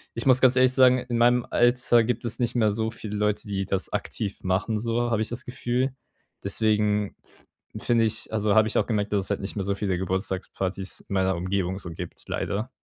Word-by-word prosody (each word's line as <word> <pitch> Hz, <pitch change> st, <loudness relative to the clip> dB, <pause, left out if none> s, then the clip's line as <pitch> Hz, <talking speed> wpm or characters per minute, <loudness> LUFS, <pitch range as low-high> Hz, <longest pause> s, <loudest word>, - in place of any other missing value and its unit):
ich 115 Hz, -, -3 dB
muss 130 Hz, -1 st, +6 dB
ganz 130 Hz, -1 st, +5 dB
ehrlich 130 Hz, 0 st, +5 dB
sagen, 130 Hz, -1 st, +5 dB
in 125 Hz, -1 st, -3 dB
meinem 120 Hz, 0 st, +4 dB
Alter 120 Hz, -1 st, +3 dB
gibt 120 Hz, 0 st, -2 dB
es 115 Hz, -, -3 dB
nicht 120 Hz, -1 st, 0 dB
mehr 110 Hz, -3 st, +3 dB
so 110 Hz, +2 st, -1 dB
viele 110 Hz, -2 st, -6 dB
Leute, 105 Hz, 0 st, 0 dB
die 95 Hz, -1 st, -1 dB
das 95 Hz, 0 st, -2 dB
aktiv 100 Hz, -2 st, -3 dB
machen, 100 Hz, +4 st, 0 dB
so, 120 Hz, +2 st, -1 dB
habe 110 Hz, -2 st, +1 dB
ich 110 Hz, -, -1 dB
das 120 Hz, -, -4 dB
Gefühl. 125 Hz, +1 st, -1 dB, 0.5 s
Deswegen 105 Hz, 0 st, +1 dB
f -, -, -20 dB, 0.4 s
finde 115 Hz, -1 st, +3 dB
ich 110 Hz, 0 st, -2 dB
also, 105 Hz, -1 st, +1 dB
habe 110 Hz, 0 st, +5 dB
ich -, -, 0 dB
auch -, -, +2 dB
gemerkt, 105 Hz, -3 st, -1 dB
dass 100 Hz, -2 st, +1 dB
es -, -, -7 dB
halt 100 Hz, -, -1 dB
nicht 95 Hz, -, -4 dB
mehr 100 Hz, -, -1 dB
so 100 Hz, 0 st, 0 dB
viele 95 Hz, -2 st, -1 dB
Geburtstagspartys 95 Hz, +1 st, -3 dB
in -, -, -9 dB
meiner 95 Hz, -1 st, +2 dB
Umgebung 95 Hz, +1 st, -2 dB
so 85 Hz, -, -7 dB
gibt, 85 Hz, +1 st, -7 dB
leider. 105 Hz, +4 st, -2 dB
105 Hz, 220 wpm, -25 LUFS, 100-120 Hz, 0.5 s, muss